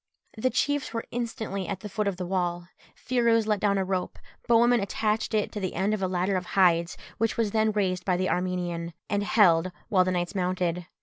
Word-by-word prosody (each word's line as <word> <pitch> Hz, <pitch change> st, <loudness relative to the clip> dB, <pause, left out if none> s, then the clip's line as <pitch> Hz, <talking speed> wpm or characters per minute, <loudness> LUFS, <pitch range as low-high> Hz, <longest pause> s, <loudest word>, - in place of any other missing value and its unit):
The 230 Hz, +4 st, 0 dB
chiefs 285 Hz, -3 st, -1 dB
were 230 Hz, -, -3 dB
instantly 220 Hz, -5 st, -3 dB
at 195 Hz, -2 st, -4 dB
the 210 Hz, -, -6 dB
foot 210 Hz, +1 st, -2 dB
of 195 Hz, -3 st, -1 dB
the 180 Hz, -, -4 dB
wall: 175 Hz, -1 st, -2 dB, 0.3 s
Phirouz 235 Hz, -3 st, +2 dB
let 210 Hz, -2 st, +1 dB
down 200 Hz, -1 st, +2 dB
a 190 Hz, -, 0 dB
rope; 185 Hz, -1 st, -2 dB, 0.3 s
Bohemund 235 Hz, +1 st, +5 dB
attached 215 Hz, +2 st, -1 dB
it 210 Hz, -, 0 dB
to 210 Hz, -, -5 dB
the 185 Hz, -2 st, -3 dB
end 200 Hz, +3 st, +1 dB
of 215 Hz, -, -2 dB
a 190 Hz, -, +1 dB
ladder 185 Hz, +1 st, 0 dB
of 180 Hz, -1 st, -5 dB
hides, 170 Hz, -2 st, +3 dB, 0.2 s
which 225 Hz, 0 st, 0 dB
was 225 Hz, -3 st, +1 dB
then 220 Hz, 0 st, +2 dB
raised 185 Hz, -4 st, -1 dB
by 180 Hz, -1 st, +1 dB
the 185 Hz, +1 st, 0 dB
Armenian, 175 Hz, -2 st, -2 dB, 0.2 s
and 205 Hz, 0 st, +1 dB
held 185 Hz, -5 st, +4 dB, 0.2 s
while 185 Hz, -3 st, +4 dB
the 185 Hz, -, -1 dB
knights 175 Hz, 0 st, -1 dB
mounted. 180 Hz, -2 st, -1 dB
195 Hz, 210 wpm, -27 LUFS, 180-215 Hz, 0.3 s, Bohemund